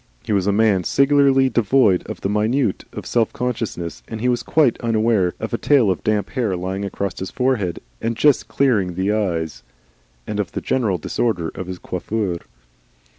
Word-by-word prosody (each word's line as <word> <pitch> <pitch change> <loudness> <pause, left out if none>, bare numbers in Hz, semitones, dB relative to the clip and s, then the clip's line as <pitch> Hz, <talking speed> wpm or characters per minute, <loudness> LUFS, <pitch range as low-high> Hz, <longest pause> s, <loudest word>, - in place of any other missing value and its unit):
He - - -2
was 100 -1 +1
a - - +4
man 100 -3 +3
singularly 135 - +4
devoid 120 -5 +3
of - - -7
the - - 0
minutiae 105 +2 0
of - - -7
self 115 -2 +1
consciousness, 115 -9 -3
and 110 - -6
he 125 +3 +1
was 120 -1 +1
quite 140 +1 +2
unaware 110 -5 +1
of 110 - -5
a 115 - 0
tail 130 -9 +4
of 90 - -3
damp 105 -1 0
hair 115 -8 -1
lying 95 +2 -3
across 100 -2 -4
his 95 - -4
forehead, 125 -9 0 0.2
and 115 0 -2
just 135 -6 +3
clearing 110 -8 +1
his 95 +3 0
eyes, 85 -7 -2 0.6
and 105 - -4
of 100 - -2
the - - -2
general 110 -8 0
disorder 90 0 -1
of 95 - -6
his 90 -1 -5
coiffure. 95 +1 -3
110 Hz, 180 wpm, -21 LUFS, 95-120 Hz, 0.6 s, a